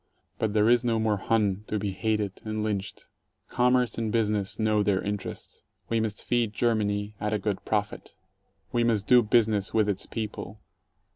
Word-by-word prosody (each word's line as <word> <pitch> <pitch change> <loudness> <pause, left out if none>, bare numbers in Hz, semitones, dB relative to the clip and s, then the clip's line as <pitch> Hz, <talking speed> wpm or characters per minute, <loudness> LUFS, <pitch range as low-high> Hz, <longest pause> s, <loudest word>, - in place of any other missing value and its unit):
But 110 -2 0
there 105 0 +4
is 120 +1 +4
no 115 -2 +1
more 110 -2 +1
"Hun" 105 -1 0
to 105 - -1
be 100 -1 -2
hated 105 0 -2
and 110 -1 -3
lynched. 100 -2 -3 0.4
Com 125 +1 +2
merce 125 -3 +1
and 110 -2 -1
business 105 -3 0
know 110 -1 +2
their 100 -2 +2
interests. 105 -1 -5 0.3
We 115 - +1
must 110 -2 -3
feed 120 -3 0
Germany 105 -3 0
— - - -34
at 105 +1 -1
a - - +2
good 100 -1 -3
profit. 105 -1 -2 0.6
We 120 -1 +1
must 110 -4 +1
do 125 +1 +6
business 110 -3 +1
with 110 -2 +3
its 100 -3 -1
people. 110 -2 -6
105 Hz, 185 wpm, -27 LUFS, 105-115 Hz, 0.6 s, do